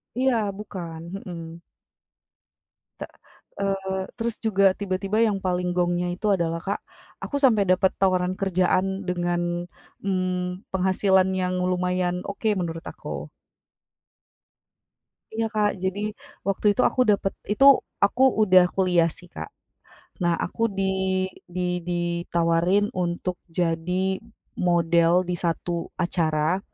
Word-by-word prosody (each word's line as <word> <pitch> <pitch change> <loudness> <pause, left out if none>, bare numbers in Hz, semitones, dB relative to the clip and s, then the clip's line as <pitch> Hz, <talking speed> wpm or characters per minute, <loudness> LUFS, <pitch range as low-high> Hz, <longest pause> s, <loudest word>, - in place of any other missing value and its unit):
Iya 260 0 +2 0.2
bukan, 175 -6 -7 0.3
mhm. 170 -1 -7 1.4
Tek - - -7 0.5
eee, 195 -1 -1
terus 230 -1 -2
juga 200 -2 +3
tiba-tiba 195 +1 -1
yang 205 -2 0
paling 180 0 0
gongnya 175 0 +1
itu 215 - -3
adalah, 165 -2 -1
Kak, 200 +1 -2 0.4
aku - - -4
sampai 225 -6 +5
dapet 185 +1 +3
tawaran 185 -1 +2
kerjaan 190 +1 +1
dengan, 175 -1 -1 0.3
mmm, 185 -1 -2
penghasilan 190 0 +3
yang 185 -1 -1
lumayan 180 0 0
oke 200 +2 -4
menurut 165 -3 -4
aku. - - -6 2.0
Iya, 225 0 0
Kak, 210 -1 +3
jadi 190 +1 -1 0.5
waktu 195 +2 -1
itu 230 - +1
aku 255 - 0
dapet 195 -1 0 0.2
itu 270 +6 +4 0.4
aku 250 +6 +1 0.2
udah 185 -1 +7
kuliah 180 -3 +3
sih, 180 - -13
Kak. 175 - -8 0.7
Nah, 170 -1 +3
aku 205 - -4 0.2
di 195 - +1 0.7
di 180 -1 0
ditawarin 175 +2 +1
untuk 180 0 -2
jadi 180 +3 0 0.5
model 170 -1 +3 0.2
di 180 - 0
satu 175 0 -2 0.3
acara, 165 -1 +1
180 Hz, 115 wpm, -25 LUFS, 175-195 Hz, 2.0 s, udah